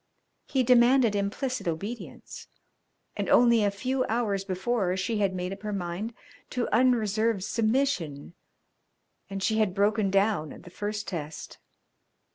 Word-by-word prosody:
He 265 -2 +1
demanded 245 -2 +5
implicit 215 +4 -2
obedience, 200 +9 -6 0.7
and - - -3
only 235 -2 +5
a 205 - +3
few 255 +6 -1
hours 215 -4 -1
before 190 0 -1
she 210 +4 -1
had 195 -2 +1
made 180 +1 -3
up 195 - -10
her 210 0 -4
mind 195 +4 -4 0.3
to 250 -1 -2
unreserved 225 -4 +2
submission, 215 - -1 1.0
and 195 -1 -4
she 220 +1 +1
had 200 -4 +1
broken 205 0 +2
down 195 -5 +1
at - - -13
the 180 - -13
first 210 +2 -4
test. 155 -4 -6
210 Hz, 135 wpm, -27 LUFS, 190-235 Hz, 1.0 s, demanded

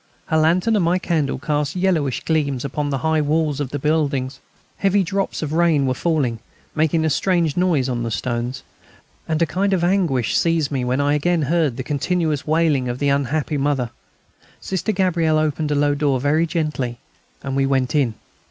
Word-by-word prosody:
Her 160 - 0
lantern 175 +8 +3
and 200 - +2
my 170 +2 +2
candle 165 -6 -1
cast 145 +1 -2
yellowish 175 -8 0
gleams 140 -5 0
upon 145 +2 -2
the 140 - -1
high 160 -1 +2
walls 150 -1 0
of 145 -3 -2
the 145 - -3
buildings. 140 -3 -1 0.4
Heavy 195 0 +2
drops 195 -1 -2
of 155 0 -3
rain 165 -4 +3
were 130 - +1
falling, 135 -6 0 0.3
making 160 +1 +1
a - - +2
strange 170 -1 +1
noise 175 -8 +1
on 120 -2 -2
the 115 - -2
stones. 120 +3 -3 0.6
And 160 -1 0
a - - +3
kind 195 +5 0
of 180 -2 +1
anguish 175 - +1
seized 165 -3 +1
me 135 -3 -1
when 125 +2 0
I 145 +1 +2
again 165 +2 +1
heard 150 -4 +1
the 130 - -3
continuous 150 +2 -1
wailing 155 -5 +2
of 120 - -3
the 145 +1 0
unhappy 140 +2 0
mother. 135 -4 0 0.7
Sister 190 +3 -2
Gabrielle 175 -5 +1
opened 155 0 0
a 145 - +1
low 145 0 +2
door 140 -2 +1
very 155 +5 +2
gently, 150 -7 -2 0.5
and 135 -1 -3
we 135 0 +2
went 130 -2 0
in. 135 -7 +1
150 Hz, 190 wpm, -21 LUFS, 135-165 Hz, 0.7 s, lantern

